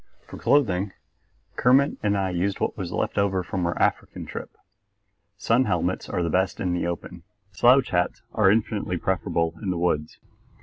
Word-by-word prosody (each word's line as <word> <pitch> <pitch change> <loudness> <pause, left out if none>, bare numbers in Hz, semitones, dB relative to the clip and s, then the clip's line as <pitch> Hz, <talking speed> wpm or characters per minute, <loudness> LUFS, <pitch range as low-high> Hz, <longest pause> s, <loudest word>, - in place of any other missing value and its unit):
For - - -10
clothing 100 -9 +2 0.6
Kermit 135 +3 +3
and 100 -1 +1
I 95 -1 -1
used 95 +3 -1
what - - -1
was 90 -2 -5
left 95 - -1
over 95 -2 +1
from 90 0 -2
our 85 - -2
African - - -1
trip. - - -7 0.9
Sun - - +2
helmets - - -1
are 85 -1 -1
best 95 +4 0
in 90 -2 -1
the 90 -1 -1
open; 85 0 -6 0.3
slouch 125 +9 +4
hats 90 -1 0
are 105 -3 +4
infinitely 105 -3 0
preferable 85 -3 -1
in 100 - -3
the 90 - -1
woods. 80 -3 -1
95 Hz, 165 wpm, -25 LUFS, 90-100 Hz, 0.9 s, slouch